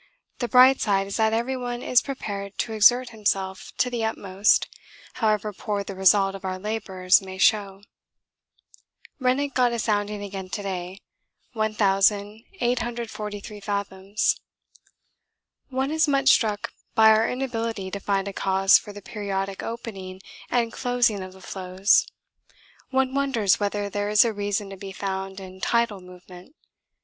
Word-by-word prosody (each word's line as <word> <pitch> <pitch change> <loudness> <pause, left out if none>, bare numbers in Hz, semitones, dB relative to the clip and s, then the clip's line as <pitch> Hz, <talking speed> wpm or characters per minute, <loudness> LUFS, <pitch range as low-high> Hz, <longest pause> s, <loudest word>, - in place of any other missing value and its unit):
The 240 - -1
bright 255 +3 +6
side 195 -2 +1
is 195 - -4
that 220 0 +3
everyone 245 +1 -2
is 250 - +4
prepared 200 -7 -6
to 225 - -2
exert 245 +4 +5
himself 195 -4 -2
to - - +2
the 240 -2 -3
utmost 200 -2 +2 0.5
however 215 -1 +1
poor 205 +1 -3
the 200 - -7
result 195 +1 +4
of 195 -1 -9
our 185 -1 -3
labours 190 -3 +1
may 190 -1 -9
show. 195 0 +2 1.4
Rennick 265 +2 0
got 250 -2 +2
a - - -1
sounding 210 -2 -1
again 195 -2 -6
to 205 - -4
day, 185 0 -5 0.5
1843 215 - -1
fathoms. 200 0 -1 1.3
One 265 +2 -1
is 315 0 +2
much 275 -1 +3
struck 210 -4 +2 0.2
by 220 0 +7
our 220 +1 +3
inability 230 -6 -3
to 200 - -4
find 195 0 -1
a 200 - -5
cause 195 0 +4
for 210 - -10
the 205 -1 -11
periodic 195 -2 -4
opening 195 -5 -7 0.3
and 235 -2 0
closing 245 -5 +1
of 185 0 -8
the 190 - -16
floes. 190 +2 +1 0.8
One 265 0 +1
wonders 265 -8 +2
whether 205 0 -1
there 205 +1 -2
is 210 +2 +5
a 230 - 0
reason 205 -1 -2
to 195 - -8
be 195 0 -8
found 190 0 -4
in 190 0 -11
tidal 235 -4 +1
movement. 180 - -14
205 Hz, 145 wpm, -24 LUFS, 195-235 Hz, 1.4 s, by